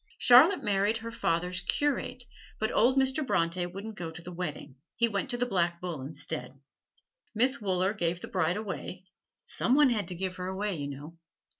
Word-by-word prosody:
Charlotte 280 +6 +7
married 205 +1 +2
her 230 +1 -7
father's 180 -4 -1
curate, 255 +3 -1 0.4
but 220 - 0
old 255 +4 +3
Mr. 265 +3 +2
Bronte 175 -7 0
wouldn't 200 +5 -7
go 170 -2 -4
to 160 +2 -10
the 180 - -8
wedding: 150 -6 -5 0.2
he 235 +1 +3
went 205 +4 -2
to 245 - 0
the 245 - +1
Black 175 -6 0
Bull 170 -6 -5
instead. 140 -1 -6 0.8
Miss 255 +3 +2
Wooler 190 0 +1
gave 175 -4 -1
the - - -8
bride 185 0 0
away 190 -3 -6 0.4
some 250 - 0
one 290 -3 +5
had 215 -4 -1
to 180 - -2
give 185 +1 -4
her 180 0 -4
away, 195 +1 -2
you 145 -3 -4
know. 145 +4 -9
190 Hz, 185 wpm, -29 LUFS, 170-230 Hz, 0.8 s, Charlotte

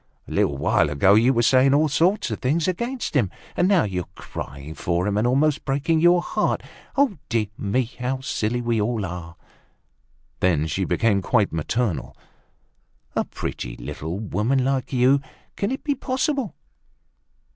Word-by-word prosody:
A - - -10
little 70 - +1
while 75 - +2
ago 75 +7 +4
you 115 +5 +5
were 120 -2 +2
saying 135 +3 +5
all 155 +2 +4
sorts 175 - +1
of 110 - -3
things 150 +7 +1
against 235 +8 -2
him; 115 -9 +3 0.3
and 180 - +3
now 195 -3 +4
you're 90 -4 -3
crying 70 +3 -7
for 85 +2 -1
him, 105 -1 0
and 110 +3 +2
almost 140 +4 +2
breaking 145 +4 +1
your 175 +1 +5
heart. - - 0 0.7
Dear 115 -2 +1
me, 105 +7 0
how 125 +2 -4
silly 120 -2 -1
we 115 -2 0
all 110 -1 -1
are!" 85 -1 -7 1.0
Then 80 -5 +2
she 85 +5 -1
became 105 -2 +2
quite 105 0 +1
maternal. 85 - -2 1.0
"A - - +1
pretty - - -5
little 80 +4 -5
woman 110 +6 0
like 135 -2 -1
you! 130 +2 +4 0.3
Can 200 - -1
it 265 - -4
be 290 - +1
possible? 265 - -1
120 Hz, 155 wpm, -23 LUFS, 95-145 Hz, 1.0 s, you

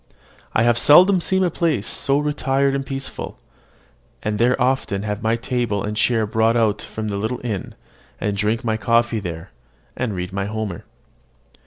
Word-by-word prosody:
I 110 - +4
have 120 0 +3
seldom 180 +5 +6
seen 190 +2 +1
a 180 - +1
place 150 - 0
so 140 +4 +1
retired 140 -2 +1
and 140 0 -1
peaceable; 135 0 -5 0.9
and 105 -1 -2
there 125 +3 +3
often 125 -6 0
have 105 0 -3
my 110 +1 +1
table 115 -3 -2
and 105 +1 -3
chair 110 0 +2
brought 110 +2 +2
out 110 -3 +1
from 110 -1 -5
the 100 - -2
little 110 +5 -2
inn, 105 -6 -4 0.4
and 105 -1 -1
drink 105 +3 0
my 110 -2 0
coffee 115 +1 +2
there, 85 -4 -7 0.4
and 115 -5 -2
read 90 +1 -5
my 100 0 -2
Homer. 105 -4 -4
115 Hz, 170 wpm, -21 LUFS, 105-130 Hz, 0.9 s, seldom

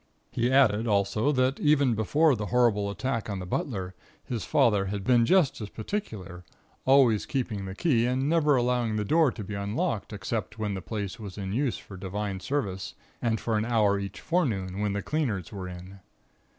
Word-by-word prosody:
He 120 +2 0
added, 115 -5 +4
also, 105 +5 +2
that 130 +1 +1
even 145 -4 +3
before 140 +8 +3
the 105 -2 -4
horrible 115 -4 +2
attack 115 +1 -3
on 100 - -2
the 90 - -5
butler 95 -1 -3 0.3
his 115 -4 -4
father 105 -4 +3
had 100 0 -3
been 120 -1 +4
just 180 -11 +3
as 105 - -5
particular, 105 - -5 0.4
always 130 -6 +4
keeping 115 -7 -2
the 95 0 -6
key 120 -5 +2
and 130 +2 0
never 150 -2 +3
allowing 120 -3 +1
the 105 -1 -1
door 155 +3 +4
to 110 - -7
be 105 +2 -7
unlocked 100 +1 -2
except 105 +2 -4
when 105 -2 -2
the 95 - -4
place 100 -2 -5
was 100 -3 -8
in 95 -1 -4
use 130 +1 0
for 95 - -11
Divine 95 +1 -4
Service, 95 -5 -3 0.3
and 115 -2 0
for 110 -2 0
an 110 - -1
hour 105 -4 +2
each 100 0 -6
forenoon 105 - -1
when 105 -1 0
the 100 -1 -3
cleaners 120 - -2
were 95 -3 -6
in. 90 +2 -10
110 Hz, 190 wpm, -27 LUFS, 100-130 Hz, 0.4 s, added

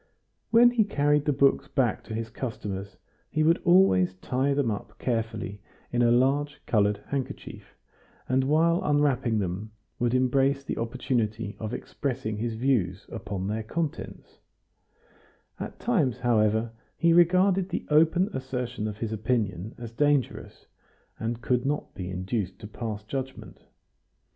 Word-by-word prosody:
When 240 +1 +7
he 235 -3 +3
carried 145 -6 +1
the 150 - +3
books 140 0 +3
back 125 -6 0
to 110 - -5
his 115 0 -4
customers, 100 -6 -5 0.3
he 155 - +1
would 165 +2 +3
always 95 - +5
tie 130 +8 -1
them 135 -5 +1
up 105 - -6
carefully 110 -4 -3 0.3
in 120 - +1
a 120 - +5
large 140 +4 +2
colored 105 -2 +1
handkerchief, 140 -2 -5 0.5
and, 130 +1 +2
while 165 +4 +3
unwrapping 145 -6 +2
them, 100 +2 -3 0.3
would 120 +1 +1
embrace 135 +2 +2
the - - -4
opportunity 115 -3 -2
of 110 -1 -4
expressing 120 -5 -3
his 115 +1 -2
views 110 -6 0
upon 100 -4 -4
their 105 +3 -2
contents; 155 +8 -5 1.2
at - - -6
times, 160 - +1
however, 110 -1 +2 0.3
he 170 0 +4
regarded 185 +2 +4
the - - -3
open 165 +5 +4
assertion 125 -4 -3
of 105 -1 -5
his 110 0 -3
opinion 110 -3 -1
as 120 -2 -7
dangerous, 145 +1 0 0.5
and 115 +1 -3
could 125 -1 +1
not 145 +2 -2
be 90 -2 -6
induced 95 +1 -3
to - - -10
pass 110 -1 -5
judgment. 130 +4 -6
120 Hz, 140 wpm, -27 LUFS, 110-145 Hz, 1.2 s, When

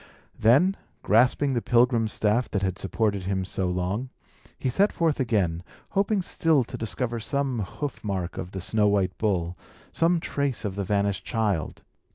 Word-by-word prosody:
Then, 145 - +4 0.3
grasping 125 +5 +3
the 120 - 0
pilgrim's 120 -2 +3
staff 110 +4 +1
that 100 -1 -1
had 95 -2 -1
supported 100 -1 -1
him 95 -1 -1
so 95 0 -2
long, 90 +8 -2 0.5
he - - -3
set 195 - +3
forth 165 -4 0
again, 100 -10 +1 0.3
hoping 200 0 +1
still 160 -5 +2
to - - -8
discover 115 +2 -2
some 135 +1 -1
hoof 135 +8 -5
mark 95 -4 -3
of 90 - -5
the 95 0 -6
snow 105 +3 +2
white 100 -2 +1
bull, 90 -5 0 0.4
some 170 +1 +2
trace 140 -7 -2
of 100 - -2
the 100 +1 -3
vanished 100 -1 0
child. 105 -8 -2
110 Hz, 165 wpm, -26 LUFS, 95-130 Hz, 0.5 s, Then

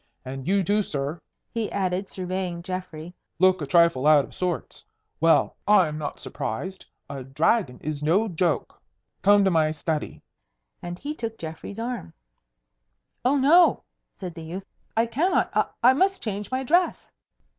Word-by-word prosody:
And 135 +2 -6
you 195 +1 +3
too, 205 +4 +2
sir," 145 -2 -4 0.3
he 230 -3 -2
added, 190 0 -1
surveying 185 -2 -4
Geoffrey, 180 -3 -6 0.2
"look 185 0 +4
a 145 - -3
trifle 170 -3 +4
out 150 -3 +6
of - - -16
sorts. 180 -2 -3 0.4
Well, 165 0 +3
I 205 -5 +6
am 155 0 -5
not 145 -2 -5
surprised. 185 - -5 0.2
A 140 -1 -6
dragon 135 - +1
is 150 -1 -3
no 180 +9 +2
joke. 175 -3 -1 0.4
Come 205 +1 +5
to 190 - +3
my 160 -2 +3
study." 155 0 -3 0.6
And 175 0 -6
he 290 +9 -5
took 230 -6 -5
Geoffrey's 160 +5 -7
arm. 230 - -5 1.1
"Oh, 265 +4 +3
no!" 320 +6 +5 0.4
said 180 -3 -6
the 165 - -9
youth. 175 +4 -7 0.3
"I 225 - +4
cannot. 290 +11 +1
I - - +3 0.2
I 250 +2 +7
must 380 +6 +1
change 205 -2 -4
my 260 +1 -1
dress." 345 +7 +1
185 Hz, 155 wpm, -25 LUFS, 155-220 Hz, 1.1 s, I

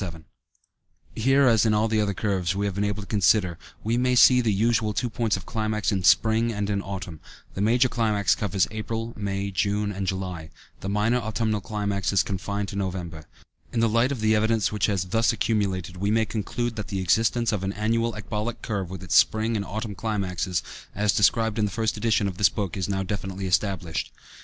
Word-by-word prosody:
77 85 -4 -6 0.9
Here, 135 +4 +3
as 115 -3 +4
in 110 -2 +3
all 110 +1 +2
the 110 -1 +1
other 100 -2 -1
curves 95 -3 -1
we 100 +1 -1
have 100 - -1
been 100 +2 -1
able 105 0 -2
to - - -12
consider, 100 -4 +2 0.2
we 115 +2 0
may 125 0 +2
see 125 +1 +7
the 115 -3 +1
usual 110 +1 +1
two 120 +2 -2
points 110 -2 0
of 95 - -10
climax 110 -1 -1
in 95 -2 0
spring 110 +6 +4
and 105 -1 -2
in 100 -1 0
autumn; 95 -5 -6 0.3
the 95 - -4
major 120 +4 +4
climax 105 -7 +1
covers 100 -2 0
April, 115 +1 -4
May, 100 -1 -3
June, 100 +2 0
and 95 -1 -4
July, 90 -4 -4 0.3
the 95 - -5
minor 105 +4 +1
autumnal 110 -1 -1
climax 100 -1 -2
is 95 -4 +3
confined 100 +1 -3
to - - -7
November. 90 -5 -4 0.5
In 120 - -1
the 115 - +4
light 115 +4 +2
of 130 -6 -3
the 110 0 +3
evidence 110 -1 +1
which 105 -2 +1
has 100 -4 0
thus 115 +6 +2
accumulated, 95 -4 -1
we 100 +3 -1
may 110 +1 +2
conclude 115 +2 -3
that 110 - -4
the 95 - -3
existence 115 +6 +2
of 105 -3 -2
an 95 - -1
annual 115 +2 0
ecbolic 110 +2 -4
curve, 100 -5 -3
with 95 0 -7
its 90 - -1
spring 110 +1 +3
and 100 - -1
autumn 110 +1 -5
climaxes, 95 -4 -2 0.3
as 105 -1 +2
described 110 +1 +2
in 105 - +2
the - - -1
first 110 0 -1
edition 105 -2 +1
of 95 -2 -6
this 100 - +6
book, 100 -4 -3
is 95 -1 -3
now 95 -1 -1
definitely 95 0 -4
established. 90 -3 -1
105 Hz, 210 wpm, -25 LUFS, 95-110 Hz, 0.9 s, see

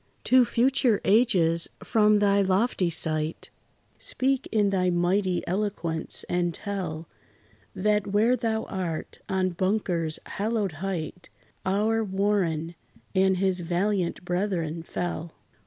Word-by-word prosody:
To 255 -1 +5
future 245 -1 +2
ages, 185 -7 +3 0.2
from 210 -1 +4
thy 200 -1 +3
lofty 190 -1 +1
site, 155 -1 -2 0.5
Speak 265 0 -1
in 210 -2 +2
thy 185 -2 +2
mighty 180 +1 +1
eloquence, 180 -4 -2
and 175 -2 0
tell 175 -6 -4 0.7
That 210 +1 +1
where 215 +5 +3
thou 225 -2 -1
art, 175 -5 -5
on 190 -1 +1
Bunker's 175 -3 0
hallowed 210 -2 -1
height, 180 -3 -4 0.4
Our 215 +4 +1
WARREN 190 -5 0 0.4
and 190 0 +3
his 190 -1 +1
valiant 180 +1 -1
brethren 175 -3 -1
fell. 170 -1 -4
190 Hz, 110 wpm, -26 LUFS, 175-210 Hz, 0.7 s, To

